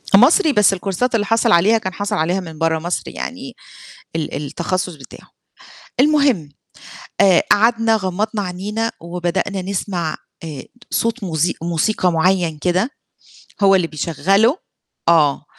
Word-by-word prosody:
مصري 295 - +5
بس 210 -3 +4
الكورسات 200 +6 -1
اللي 205 - +1
حاصِل 225 +2 +2
عليها 200 +7 +5
كان 190 -3 -4
حاصِل 205 0 -2
عليها 175 +5 0
من 160 -4 -9
برّه 165 0 +1
مصر، 175 +2 -3
يعني 255 0 -7 0.6
ال 155 -2 -3
التخصُّص 175 +4 -3
بتاعه، 135 -4 -14 0.7
المهم 275 - +3 0.7
آآ، 190 -3 +5
قعدنا 225 +1 +4
غمّضنا 205 +2 -2
عينينا 205 +5 -3
وبدأنا 175 +3 -2
نسمع 185 -4 -3 0.3
آآ، 150 -5 -7 0.3
صوت 230 -1 -1
موز 170 -1 0
موسيقى 175 +3 0
معيّن 170 -1 +1
كده 180 - 0 0.7
هو 195 0 +6
اللي 180 -3 +1
بيشغّله 195 - +1 0.5
آه 150 -3 +3
185 Hz, 125 wpm, -19 LUFS, 170-220 Hz, 0.7 s, هو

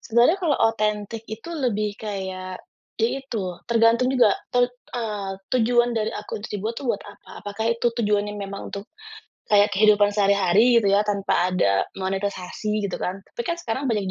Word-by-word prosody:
Sebenarnya 240 +10 +3
kalau 310 -5 +2
otentik 215 -1 0
itu 220 +9 -7
lebih 215 -9 -1
kayak, 190 -3 -5 0.4
ya 225 0 +3
itu, 270 -3 -6 0.3
tergantung 230 +2 +4
juga 245 -6 +5 0.2
ten 245 0 +4 0.3
eee, 210 -4 -3 0.2
tujuan 240 0 +3
dari 215 -2 0
akun 210 0 -6
itu 210 - -4
dibuat 220 +4 -3
tuh 265 - -4
buat 210 - -1
apa? 205 0 -13
Apakah 205 +2 -4
itu 235 +1 0
tujuannya 210 -2 0
memang 200 -1 -6
untuk 200 +1 -6 0.6
kayak 205 0 +4
kehidupan 205 0 +4
sehari-hari 200 +3 +4
gitu 230 - +2
ya, 200 - +5
tanpa 195 -3 +1
ada 100 - +2 0.2
monetisasi, 195 +2 -2
gitu 195 - -4
kan. 185 +2 -2
Tapi 475 - -6
kan 340 - 0
sekarang 265 -3 -3
banyak 210 -4 0
210 Hz, 165 wpm, -24 LUFS, 200-230 Hz, 0.6 s, juga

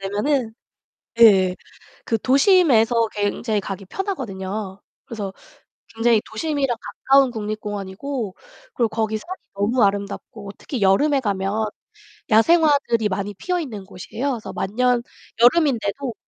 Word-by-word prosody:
되면은 220 +5 -1 0.7
예. 190 -5 +6 0.5
그 225 - 0
도심에서 255 - +4
굉장히 210 +1 -1
가기 195 0 -6
편하거든요. 200 - -5 0.2
그래서 210 -6 -6 0.6
굉장히 225 -1 +3
도심이랑 275 0 -1 0.3
가까운 270 -1 +5
국립공원이고 210 +1 -5 0.4
그리고 235 -2 +1
거기 220 0 -1
산이 365 - -8 0.2
너무 220 +5 +1
아름답고 200 0 -2
특히 255 -7 -5
여름에 275 +10 +3
가면 205 -1 -1 0.6
야생화들이 280 -2 +4
많이 200 +2 -3
피어있는 275 - -4
곳이에요. 220 +8 -4
그래서 230 -3 -6
만년 240 +5 0 0.4
여름인데도 250 -3 +2
225 Hz, 305 characters per minute, -22 LUFS, 200-270 Hz, 0.7 s, 예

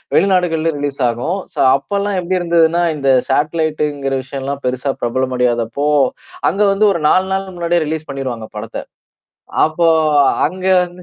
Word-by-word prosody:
வெளிநாடுகள்ல 170 -4 +2
ரிலீஸ் 145 -1 -4
ஆகும். 125 +12 -2
சோ - - -7 0.2
அப்பலாம் 200 +8 -2
எப்படி 180 +1 -1
இருந்ததுன்னா, 170 0 +2
இந்த 140 -2 +1 0.2
சாட்லைடங்கிற 150 -3 -1
விஷயம்லாம் 135 +1 -5
பெருசா 130 +2 -1
பிரபலம் 130 +2 -1
அடியாதப்போ 120 +3 0 0.6
அங்க 200 - -2
வந்து 210 +2 +3
ஒரு 170 - -2
4 185 0 +3
நாள் 190 -1 -3
முன்னாடியே 170 -1 0
ரிலீஸ் 155 0 -4
பண்ணிருவாங்க 125 -5 -5
படத்த. 105 - -6 0.8
அப்போ 165 +2 +1 0.6
அங்க 185 +3 -6 0.2
வந்து 180 0 -12
155 Hz, 135 wpm, -17 LUFS, 135-175 Hz, 0.8 s, வந்து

